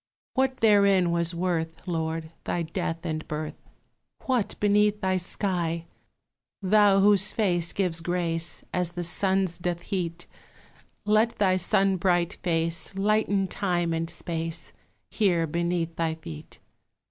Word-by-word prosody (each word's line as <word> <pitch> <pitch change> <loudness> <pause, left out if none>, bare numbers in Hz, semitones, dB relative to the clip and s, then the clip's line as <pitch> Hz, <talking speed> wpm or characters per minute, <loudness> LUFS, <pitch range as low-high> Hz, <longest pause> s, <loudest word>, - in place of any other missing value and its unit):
What 260 0 +1
therein 200 -5 +4
was 170 0 +1
worth, 170 -1 -2
Lord, 160 -1 -2
thy 175 - -1
death 165 +1 -4
and 155 -1 -3
birth? 155 0 -5 0.6
What 250 -6 0
beneath 210 0 +3
thy 190 -2 +1
sky? 175 -2 -2 0.7
Thou 200 0 +4
whose 200 -1 +4
face 175 -6 +1
gives 175 -4 -1
grace 170 -1 -1
As 180 -1 -1
the 175 0 -3
sun's 190 0 0
doth 175 -1 -3
heat, 175 -3 -3 0.8
Let 215 +2 +2
thy 190 -2 +3
sunbright 185 -1 +2
face 165 0 0
Lighten 200 -1 +1
time 175 -4 -1
and 165 0 -2
space 165 -1 -4 0.4
Here 180 -6 +2
beneath 170 +1 -1
thy 165 -1 0
feet. 80 - -10
175 Hz, 125 wpm, -26 LUFS, 165-195 Hz, 0.8 s, therein